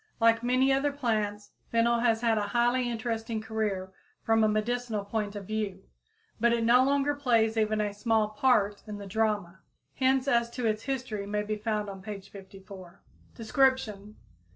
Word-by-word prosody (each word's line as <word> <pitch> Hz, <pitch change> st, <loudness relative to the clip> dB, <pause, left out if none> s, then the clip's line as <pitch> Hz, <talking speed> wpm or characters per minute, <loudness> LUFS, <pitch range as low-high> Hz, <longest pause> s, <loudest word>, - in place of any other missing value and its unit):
Like 230 Hz, 0 st, +4 dB
many 255 Hz, +2 st, +3 dB
other 280 Hz, +2 st, +1 dB
plants, 215 Hz, -6 st, -2 dB, 0.2 s
fennel 235 Hz, +1 st, +3 dB
has 230 Hz, -2 st, +2 dB
had 225 Hz, -2 st, +2 dB
a 205 Hz, -, -2 dB
highly 245 Hz, +1 st, +2 dB
interesting 225 Hz, -1 st, -3 dB
career 215 Hz, -4 st, -3 dB, 0.3 s
from 225 Hz, 0 st, +3 dB
a -, -, +5 dB
medical 215 Hz, 0 st, -1 dB
point 210 Hz, 0 st, -3 dB
of 200 Hz, -1 st, -6 dB
view. 215 Hz, -1 st, -3 dB, 0.6 s
But 235 Hz, +1 st, +3 dB
it 235 Hz, -1 st, 0 dB
no 240 Hz, +3 st, +5 dB
longer 280 Hz, +1 st, +2 dB
plays 230 Hz, -6 st, +2 dB
even 215 Hz, -1 st, +1 dB
a 205 Hz, -1 st, -1 dB
"small 215 Hz, 0 st, +1 dB
part" 210 Hz, -3 st, +2 dB
in 210 Hz, -1 st, -6 dB
the 200 Hz, -, -8 dB
drama. 200 Hz, -3 st, -1 dB, 0.3 s
Hints 265 Hz, 0 st, +1 dB
as 235 Hz, -3 st, +2 dB
to 250 Hz, -, -2 dB
its 215 Hz, -1 st, 0 dB
history 245 Hz, -7 st, -4 dB
may 210 Hz, 0 st, -1 dB
be 215 Hz, +1 st, -2 dB
found 210 Hz, -1 st, -2 dB
on 195 Hz, -1 st, -8 dB
page 195 Hz, -1 st, -8 dB
54. 190 Hz, -2 st, -12 dB, 0.3 s
_Description. 220 Hz, -4 st, 0 dB
220 Hz, 170 wpm, -28 LUFS, 210-240 Hz, 0.6 s, a